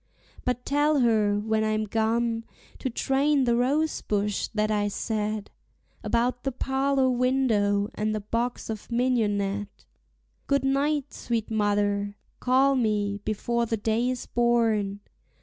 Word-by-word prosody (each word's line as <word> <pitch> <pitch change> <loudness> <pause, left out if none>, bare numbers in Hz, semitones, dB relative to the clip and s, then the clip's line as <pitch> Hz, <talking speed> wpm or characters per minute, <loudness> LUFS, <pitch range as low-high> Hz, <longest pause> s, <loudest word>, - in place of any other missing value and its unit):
But 250 0 -1
tell 290 0 +2
her, 215 -3 +3
when 220 +1 0
I'm 215 0 0
gone, 225 +2 0 0.4
to 260 - -2
train 275 +3 +1
the 235 -2 +2
rosebush 245 -6 0
that 215 -1 -1
I 205 -1 +1
set 215 0 -3 0.5
About 245 +1 0
the 270 - -2
parlor 270 +1 +1
window 240 -6 +2
and 215 0 -1
the - - -1
box 230 +4 -2
of 215 +2 -8
mignonette. 205 -5 0 0.6
Good 280 -1 +1
night, 285 +1 0
sweet 230 -2 -3
mother! 205 -1 0 0.2
Call 265 +2 +3
me 210 -4 0
before 235 +2 -1
the 225 - -1
day 225 +4 0
is 255 -1 -3
born. 225 -4 +1
230 Hz, 130 wpm, -26 LUFS, 210-255 Hz, 0.6 s, her